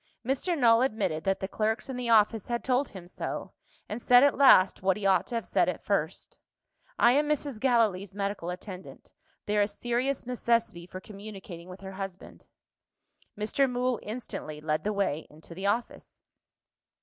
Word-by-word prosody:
Mr. 275 +7 0
Null 230 -3 +5
admitted 200 -11 -1
that 195 0 0
the 190 - -2
clerks 220 +5 -1
in 265 - -5
the 245 -1 -3
office 220 -1 +4
had 235 0 -2
told 260 +2 +1
him 185 -4 -10
so, - - -5 0.3
and 215 +3 -5
said 245 +2 +6
at 285 - +5
last, 255 -9 +6
what 190 +1 +2
he 205 - -5
ought 195 -1 +3
to 240 - -4
have 230 - -2
said - - +2
at - - -5
first: - - -2 0.6
"I 235 - +6
am 295 +3 +2
Mrs. 285 -5 -1
Gallilee's 215 -7 +1
medical 200 -3 -3
attendant 185 +1 -9 0.3
there 210 0 +2
is 205 0 0
serious 245 +3 -1
necessity 230 -7 0
for 185 - -8
communicating 195 -4 -10
with 185 +1 -10
her 190 0 -7
husband." 195 -1 -8 0.9
Mr. 240 +6 +1
Mool 250 -1 0
instantly 210 -9 -6
led 155 0 -1
the 210 - 0
way 195 -7 -1
into 155 +2 -13
the 190 +3 -3
office. 230 +4 -3
210 Hz, 175 wpm, -28 LUFS, 190-245 Hz, 0.9 s, said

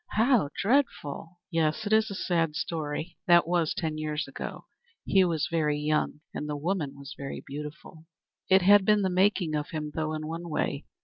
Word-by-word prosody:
"How 225 - +3
dreadful!" 190 - 0
"Yes, 165 +5 0
it 205 - 0
is 220 0 +4
a 200 - -5
sad 165 -5 0
story. 160 +1 -4
That 175 -2 +6
was 170 -2 +1
ten 155 -2 -2
years 155 0 -2
ago. - - -7 0.4
He 190 -1 +4
was 165 -4 0
very 150 -3 +1
young 150 0 0
and 150 - -4
the 150 - -2
woman 155 -2 -2
was 140 +3 -9
very 140 -1 -6
beautiful. 150 +3 -9 0.4
It 190 -1 +6
has 205 +2 +7
been 210 +1 +3
the 190 - +1
making 185 -3 +2
of 150 -1 -2
him, 150 -2 -4
though, 155 0 -2
in 155 0 -4
one 165 +2 -5
way. 145 -2 -2
165 Hz, 185 wpm, -28 LUFS, 150-190 Hz, 0.4 s, has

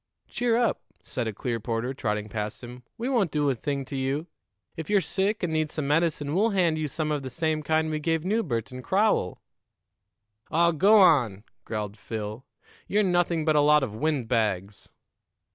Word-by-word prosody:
"Cheer 240 -1 0
up," 240 -1 +1 0.2
said 120 -3 -3
a - - -1
Clearporter, 115 +3 -3
trotting 105 -4 -2
past 105 +2 -5
him. 125 +1 -9 0.2
"We 235 - -3
won't 235 -9 +2
do 145 -2 +1
a - - +1
thing 140 +3 -3
to 140 - -7
you. 135 +4 -1 0.5
If 160 -2 -6
you're 205 -1 +4
sick 195 +2 -1
and 165 -2 -1
need 155 -1 0
some 150 -2 -4
medicine, 150 -1 +1
we'll 210 +6 +3
hand 175 -6 +1
you 155 - -1
some 155 +1 -2
of 150 -1 -1
the 130 - -6
same 155 +3 -1
kind 155 +1 +1
we 155 - -1
gave 160 +1 -1
Newbert 160 - -1
and 130 0 -8
Crowell." 195 - +1 1.1
"Aw, 170 +1 +3
go 195 +7 +5
on!" 130 - +4 0.2
growled 105 -2 -4
Phil. 110 +2 -6 0.4
"You're 210 +1 +2
nothing 175 -3 +1
but 155 -1 +3
a 150 - +5
lot 150 0 +5
of 115 -6 -3
wind 140 0 -1
bags." 105 -4 -1
150 Hz, 185 wpm, -26 LUFS, 120-170 Hz, 1.1 s, go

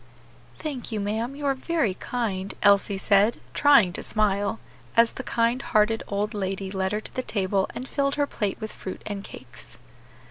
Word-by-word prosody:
"Thank 270 -6 -5
you, 215 - -2
ma'am, 220 +6 -2
you 290 0 -6
are 275 - +3
very 270 - 0
kind," 200 -3 -3
Elsie 200 -1 +4
said, 205 +3 +3
trying 275 -11 +5
to - - -1
smile, 205 0 0 0.4
as 230 0 +6
the - - -5
kind 235 0 +1
hearted 215 -1 +2
old 205 +2 -1
lady 195 -1 -2
led 190 -1 -1
her 210 +1 -1
to - - -9
the 255 - -1
table 195 -4 0
and 255 - -5
filled 275 0 0
her 290 - +2
plate 205 -8 -3
with 215 - -6
fruit 185 - -7
and 200 -1 -4
cakes. 120 - -12
210 Hz, 180 wpm, -25 LUFS, 195-245 Hz, 0.4 s, as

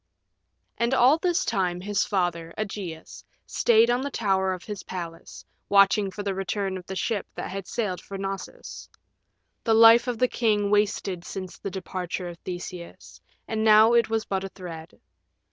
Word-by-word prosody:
And 235 +3 +2
all 265 +6 +5
this 355 0 +1
time 180 -2 0
his 205 +2 0
father, 175 -4 -2
Ægeus, 195 -6 -6 0.2
stayed 230 0 +3
on 245 +1 +1
the 280 - -3
tower 190 -6 0
of 185 -1 -5
his 205 -3 -6
palace, 170 -3 -8 0.2
watching 200 0 +4
for 205 +2 -6
the 200 -1 -1
return 195 0 -2
of 180 -1 -8
the 190 - -5
ship 205 +3 -2
that - - -5
had 195 -1 -6
sailed 195 -7 -2
for 195 - -8
Knossos. 195 0 -7 0.7
The 225 -2 +3
life 230 +2 +7
of 245 -2 -1
the 250 - +3
king 210 -4 +1
wasted 200 -3 0
since 185 0 -7
the 195 - -4
departure 185 -1 -5
of 170 0 -10
Theseus, 180 -1 -8 0.3
and 220 -1 -2
now 220 +1 +6
it 235 -2 +3
was 225 -1 -1
but 195 -1 -2
a 195 - -5
thread. 170 -4 -10
195 Hz, 170 wpm, -25 LUFS, 185-220 Hz, 0.7 s, life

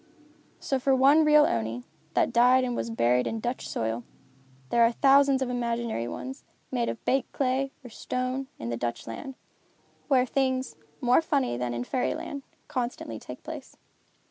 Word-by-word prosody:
So 270 - -1
for 265 +1 +3
one 280 +4 +6
real 300 -1 +6
Oni, 115 +1 -2 0.3
that - - +2
died 250 +2 +5
and 245 -1 -1
was 230 - -2
buried 125 - +2
in 225 - -2
Dutch 240 +3 -3
soil, 115 +1 -2 0.7
there 235 - +3
are 230 0 +6
thousands 275 +1 +4
of 255 - -3
imaginary 235 - -2
ones, 265 - -6 0.3
made 240 -2 0
of - - -6
baked 265 -1 +1
clay, 270 0 0
or 245 - -9
stone, 255 +4 -3
in 115 - -5
the 115 - -2
Dutch 120 0 -3
land, 115 - -7 0.7
where 260 -3 +4
things, 260 0 0 0.3
more 245 +4 +4
funny 285 - 0
than 120 0 -2
in 120 - -2
fairy 250 - -1
land, 280 - -6 0.3
constantly 240 - -4
take 125 - -10
place. - - -8
250 Hz, 170 wpm, -27 LUFS, -, 0.7 s, one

